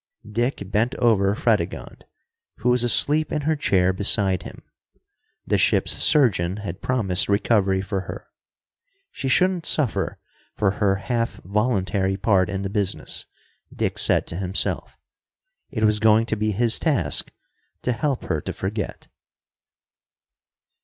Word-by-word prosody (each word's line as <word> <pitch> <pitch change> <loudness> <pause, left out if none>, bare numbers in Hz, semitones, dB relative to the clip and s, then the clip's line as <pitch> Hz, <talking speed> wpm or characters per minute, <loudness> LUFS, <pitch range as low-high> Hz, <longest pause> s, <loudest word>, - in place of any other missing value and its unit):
Dick 120 +1 -1
bent 115 +4 +1
over 100 -4 +2
Fredegonde, 105 -7 -2 0.5
who 125 - 0
was 125 0 +2
asleep 145 +5 +2
in 150 - -1
her 155 +2 +1
chair 95 -10 +2
beside 95 -1 +2
him. - - -11 0.8
The - - +1
ship's - - +2
surgeon 100 - +2
had 90 0 -6
promised 100 -8 0
recovery 100 -2 +2
for 100 -1 -3
her. - - -7 0.9
She 135 - -5
shouldn't 180 +4 +2
suffer 140 -7 0 0.4
for 100 -2 +1
her 100 -1 +1
half 115 +4 -2
voluntary 95 -2 0
part 95 -4 +2
in 100 0 -3
the 95 - -3
business, 100 -2 -2 0.4
Dick - - -2
said - - +4
to 85 - -5
himself. 95 0 -2 0.7
It 110 -5 -3
was 105 0 +3
going 110 +1 +4
to 110 - -1
be 110 0 -1
his 115 +3 +2
task 155 -6 0 0.5
to 125 - 0
help 125 +3 -1
her 80 - -2
to - - -5
forget. 100 +1 -5
105 Hz, 135 wpm, -23 LUFS, 95-120 Hz, 0.9 s, said